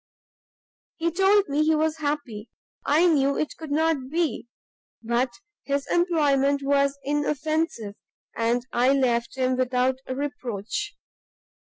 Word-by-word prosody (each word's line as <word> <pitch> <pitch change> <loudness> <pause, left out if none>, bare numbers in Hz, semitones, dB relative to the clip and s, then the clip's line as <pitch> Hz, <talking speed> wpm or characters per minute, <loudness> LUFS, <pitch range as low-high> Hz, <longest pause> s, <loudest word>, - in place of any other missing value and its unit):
He 335 +1 0
told 390 +3 +3
me 290 +2 +1
he 315 +1 +3
was 315 +1 0
happy; 285 -8 -4 0.4
I 315 +5 +4
knew 280 -5 +3
it 305 - -2
could 320 -2 -9
not 300 -3 0
be: 320 -5 -1 0.6
but 240 +3 +1 0.3
his 280 0 -1
employment 285 -5 +2
was 280 0 +2
inoffensive, 295 -5 -1 0.4
and 235 +2 0
I 250 +3 +3
left 245 -2 0
him 255 -1 +1
without 255 0 +1
reproach. 275 - -4
280 Hz, 115 wpm, -25 LUFS, 255-315 Hz, 0.6 s, I